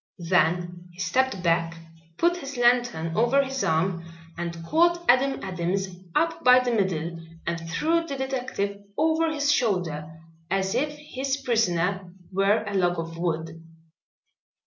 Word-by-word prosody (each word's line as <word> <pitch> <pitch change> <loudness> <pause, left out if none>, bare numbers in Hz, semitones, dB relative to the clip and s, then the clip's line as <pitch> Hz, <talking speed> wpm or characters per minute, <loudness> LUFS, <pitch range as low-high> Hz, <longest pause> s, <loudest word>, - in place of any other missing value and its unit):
Then 175 +1 +1
he 175 - -18
stepped 255 0 0
back, 165 -1 +1 0.4
put 345 +1 +2
his 275 -5 -7
lantern 240 -9 +2
over 240 +6 +3
his 270 0 -3
arm 170 +2 0 0.3
and 170 -1 -5
caught 345 - +2
Adam 270 +2 +4
Adams 190 +1 -2 0.3
up 330 +1 +1
by 250 0 +8
the 250 -1 -1
middle 175 -6 -1 0.3
and 165 -1 -3
threw 325 - +1
the 280 -3 -4
detective 250 -7 -3 0.2
over 320 +1 +2
his 290 -1 +1
shoulder 175 - 0 0.4
as 190 +1 0
if 295 +2 0
his 275 -2 -3
prisoner 195 -7 0 0.2
were 195 +3 +2
a 205 - -5
log 175 -2 +2
of 165 0 -5
wood. 165 -1 -3
195 Hz, 140 wpm, -25 LUFS, 170-265 Hz, 0.4 s, by